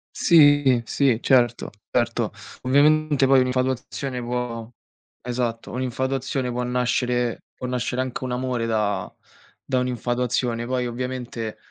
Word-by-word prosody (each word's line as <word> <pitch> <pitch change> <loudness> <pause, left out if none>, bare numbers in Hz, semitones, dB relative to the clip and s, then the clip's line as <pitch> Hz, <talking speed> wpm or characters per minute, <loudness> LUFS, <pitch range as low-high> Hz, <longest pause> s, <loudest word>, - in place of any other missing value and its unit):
Sì, 145 -6 +5
sì, 130 -4 +2
certo, 120 -3 +2 0.2
certo. 120 -2 0 0.3
Ovviamente 145 +2 +3
poi 135 0 +5
un'infatuazione 130 0 -1
può 120 -1 -4 0.5
esatto. 120 -1 -3
Un'infatuazione 130 +1 -2
può 125 +1 -2
nascere 125 -1 0
può - - -7
nascere 125 0 -1
anche 130 0 -5
un 130 - -3
amore 125 -2 -1
da 105 -2 -1 0.5
da 130 -2 +1
un'infatuazione. 120 -1 -1
Poi 125 -1 -1
ovviamente 120 -2 -4
125 Hz, 115 wpm, -23 LUFS, 120-130 Hz, 0.5 s, Sì